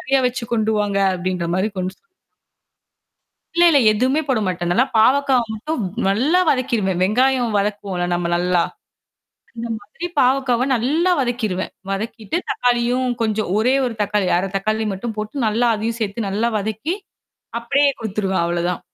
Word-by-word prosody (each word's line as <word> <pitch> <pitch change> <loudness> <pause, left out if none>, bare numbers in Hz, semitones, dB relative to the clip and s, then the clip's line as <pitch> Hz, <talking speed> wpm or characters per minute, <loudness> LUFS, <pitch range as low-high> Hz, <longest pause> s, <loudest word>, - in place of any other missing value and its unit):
நெறையா 270 +1 +1
வச்சு 250 0 -3
கொண்டு 220 -1 +1
வாங்க" 200 -1 0 0.2
அப்டின்ற 180 -1 -2
மாரி 195 +3 +1
கொண்டு 185 +1 -2
ச - - -45 1.5
இல்ல 345 - +5
இல்ல 290 - +5
எதுவுமே 260 +7 +1
போட 260 - +2
மாட்டேன். 175 -1 -2
நல்லா 245 +8 +4
பாவக்காவ 265 +2 +4
மட்டும் 300 +6 -3 0.3
நல்லா 260 - +2
வதக்கிருவேன். 230 -9 0
வெங்காயம் 245 +3 +2
வதக்குவோம்ல 200 -3 -2
நம்ம 175 0 0
நல்லா. 180 0 +2 0.9
இந்த 235 +1 -4
மாதிரி 320 +12 -7
பாவக்காவ 255 -1 +2
நல்லா 300 +10 +1
வதக்கிருவேன். 225 -7 -2 0.2
வதக்கிட்டு 220 +6 -3
தக்காளியும் 245 +1 +1
கொஞ்சம் 215 -3 0
ஒரே 250 +5 +3
1 245 - -2
தக்காளி 205 -2 0
1/2 190 +2 0
தக்காளி 215 +3 -1
மட்டும் 220 +4 -5
போட்டு 215 +5 -3
நல்லா 225 +3 +2
அதையும் 225 +2 -3
சேத்து 210 0 -2
நல்லா 215 +4 0
வதக்கி. 220 - -2 0.7
அப்படியே 280 +4 +2
குடுத்துருவேன். 195 -4 -1
அவ்ளோதான். 175 +1 -1
220 Hz, 145 wpm, -20 LUFS, 195-255 Hz, 1.5 s, இல்ல